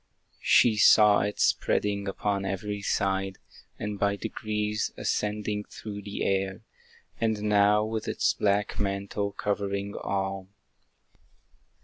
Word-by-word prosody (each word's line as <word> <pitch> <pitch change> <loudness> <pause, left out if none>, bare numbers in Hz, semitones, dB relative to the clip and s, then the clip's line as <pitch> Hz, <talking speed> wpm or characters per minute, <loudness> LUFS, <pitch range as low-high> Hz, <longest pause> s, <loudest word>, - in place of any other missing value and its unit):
She 110 -3 +5
saw 105 -1 +7
it 105 0 -2
spreading 100 -1 +1
upon 100 0 -1
every 100 +1 -3
side, 95 -1 -1 0.4
And 105 -1 -4
by 100 0 +2
degrees 105 0 -2
ascending 105 0 -2
through 105 -2 -8
the 100 0 -5
air, 95 +1 -1 0.6
And 110 -2 0
now 105 0 +4
with 110 0 -4
its - - +1
black 105 0 0
mantle 100 0 -2
covering 100 0 -2
all. 95 -1 -3
100 Hz, 110 wpm, -27 LUFS, 100-105 Hz, 0.6 s, saw